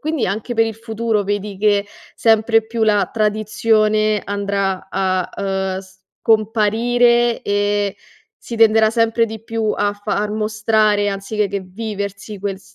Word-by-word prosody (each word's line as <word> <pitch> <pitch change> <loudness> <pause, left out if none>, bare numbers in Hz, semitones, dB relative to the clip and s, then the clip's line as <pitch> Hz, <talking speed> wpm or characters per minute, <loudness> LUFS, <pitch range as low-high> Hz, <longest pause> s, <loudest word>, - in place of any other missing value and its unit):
quindi 310 -4 -1
anche 215 +6 -3
per 225 0 +4
il 225 - -4
futuro 225 -1 -2
vedi 205 0 -3
che 205 -1 +2 0.3
sempre 225 0 +3
più 225 0 -3
la 210 -2 +3
tradizione 215 0 +1
andrà 200 -2 -2
a, 185 -1 0 0.5
uhm, - - -4
scomparire 225 +5 +1
e 205 0 0 0.4
si 235 - -8
tenderà 220 -1 +5
sempre 230 0 +2
di 220 0 -8
più 225 -1 -1
a 205 0 0
far 205 0 -2
mostrare 215 -1 +1
anzichè 200 +1 -2
che 200 0 -3
viversi 200 +1 -6
quel 195 -1 -4
s 195 0 -22
215 Hz, 135 wpm, -19 LUFS, 200-225 Hz, 0.5 s, tenderà